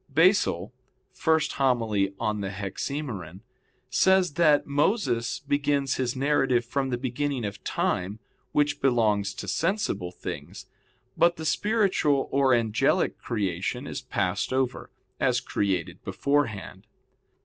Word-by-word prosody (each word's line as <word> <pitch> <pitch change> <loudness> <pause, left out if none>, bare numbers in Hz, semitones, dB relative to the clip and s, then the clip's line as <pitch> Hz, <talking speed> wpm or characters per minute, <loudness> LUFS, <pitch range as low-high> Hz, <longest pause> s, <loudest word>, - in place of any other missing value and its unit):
Basil 150 - +3 0.5
[*Hom. 135 -6 +2
i 100 -1 0
in 105 -1 -4
Hexaem.] 100 - -5 0.5
says 190 -1 +4
that 150 -2 +4
Moses 145 - 0
begins 145 -1 0
his 125 -1 -1
narrative 135 -3 +2
from 135 +2 -1
the 125 - -1
beginning 130 0 -2
of 100 0 -6
time 95 +4 -1 0.3
which 145 0 +1
belongs 110 -6 +2
to 100 - -6
sensible 155 - -1
things; - - -7 0.5
but 170 0 +4
that 160 - -9
the - - -4
spiritual 190 -8 +2
or 135 -1 +3
angelic 115 -2 +2
creation 95 -6 -2
is - - -5
passed - - -1
over, 130 -1 -1 0.3
as - - +2
created 95 -5 -2
beforehand. 140 -8 -1
130 Hz, 115 wpm, -26 LUFS, 105-145 Hz, 0.5 s, says